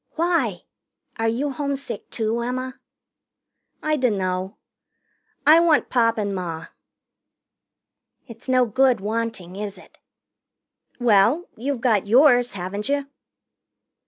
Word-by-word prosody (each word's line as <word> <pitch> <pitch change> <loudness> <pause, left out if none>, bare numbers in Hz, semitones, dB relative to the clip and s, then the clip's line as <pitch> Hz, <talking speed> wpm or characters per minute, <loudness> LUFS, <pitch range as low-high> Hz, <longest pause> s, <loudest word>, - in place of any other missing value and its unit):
"Why? 315 - 0 0.6
Are 225 - +1
you 260 +6 -1
homesick, 280 0 -4
too, 225 +1 -2
Emma?" 255 +2 -4 1.0
"I 310 0 +1
dunno. 190 -6 -1 0.9
I 315 +2 +8
want 335 -3 +2
Pop 230 -2 +2
and 205 -2 -2
Ma." 165 -3 -5 1.6
"It's 230 +1 -12
no 255 -1 +4
good 255 +1 +2
wanting, 215 -3 -4
is 205 -1 -5
it?" - - -18 1.0
"Well, 240 - +3
you've 260 +1 -3
got 215 -6 +2
yours, 245 +1 +5
haven't 200 +4 -4
you?" 280 0 -1
235 Hz, 105 wpm, -23 LUFS, 205-270 Hz, 1.6 s, I